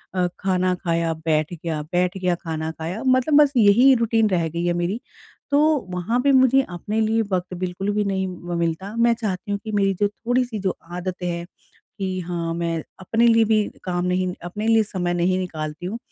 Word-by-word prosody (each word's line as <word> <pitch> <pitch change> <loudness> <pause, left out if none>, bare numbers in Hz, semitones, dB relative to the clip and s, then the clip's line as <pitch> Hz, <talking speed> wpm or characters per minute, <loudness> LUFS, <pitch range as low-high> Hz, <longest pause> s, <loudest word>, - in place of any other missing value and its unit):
अ, 180 -1 +2
खाना 185 -1 +1
खाया 170 -2 -1
बैठ 155 +1 +1
गया, 160 -2 -4
बैठ 180 +4 -1
गया 180 -2 +1
खाना 160 -1 -3
खाया 165 +8 -5
मतलब 260 +3 +3
बस 290 -1 +3
यही 235 +5 +6
रूटीन 225 -2 +2
रह 170 -4 +1
गई 170 +2 -3
है 175 - +2
मेरी। 175 +6 -1 0.5
तो 285 - +4 0.3
वहाँ 180 +7 -1
पे 280 +2 +3
मुझे 260 0 +5
अपने 195 +5 -3
लिए 220 +1 +2
वक्त 180 0 -1
बिल्कुल 185 +2 -3
भी 210 0 +1
नहीं 190 -1 -1
म 175 -1 -5
मिलता। 170 +5 -2
मैं 235 0 +4
चाहती 210 -3 -4
हूँ 200 - -1
कि 220 - -5
मेरी 200 -2 +2
जो 205 - +3
थोड़ी-सी 240 +2 -1
जो 190 -2 -1 0.2
आदतें 180 0 -4
हैं 170 0 -3 0.5
कि 190 -2 -2
हाँ 170 -2 -2
मैं 170 -1 -1 0.2
अपने 225 +5 +2
लिए 230 -1 +5
भी 215 -1 +3 0.2
काम 180 -1 -1
नहीं 180 +1 +1 0.2
अपने 205 +5 -4
लिए 225 0 +5
समय 180 -4 -2
नहीं 180 +1 +1
निकालती 160 -2 -5
हूँ। 215 +5 -4
185 Hz, 195 wpm, -22 LUFS, 175-220 Hz, 0.5 s, यही